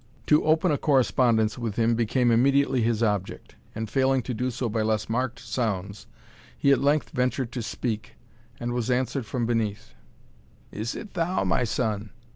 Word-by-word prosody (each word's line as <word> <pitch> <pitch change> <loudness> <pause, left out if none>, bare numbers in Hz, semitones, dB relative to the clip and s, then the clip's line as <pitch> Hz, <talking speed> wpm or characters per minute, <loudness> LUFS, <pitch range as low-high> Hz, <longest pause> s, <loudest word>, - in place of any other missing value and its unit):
To 150 - +4
open 160 +2 +3
a 145 - 0
correspondence 120 -5 +2
with 115 -4 -3
him 115 0 +2
became 120 +2 +2
immediately 135 +2 +3
his 115 0 +1
object, 105 -4 -2 0.2
and 110 0 -3
failing 135 +2 +1
to 125 - -4
do 125 +3 -1
so 125 0 -3
by 110 0 -1
less 110 0 0
marked 120 +2 -1
sounds, 105 -5 -3 0.5
he 140 - +3
at 135 - +4
length 145 +2 +1
ventured 125 -1 -1
to 125 - -4
speak, 110 -1 -4 0.4
and 120 0 -3
was 120 0 -2
answered 125 -1 0
from 120 0 -2
beneath 115 +1 -2 0.8
"Is 110 +3 -4
it 210 - -8
thou, 180 0 0
my - - +1
son?" 110 -2 -2
120 Hz, 170 wpm, -26 LUFS, 110-130 Hz, 0.8 s, To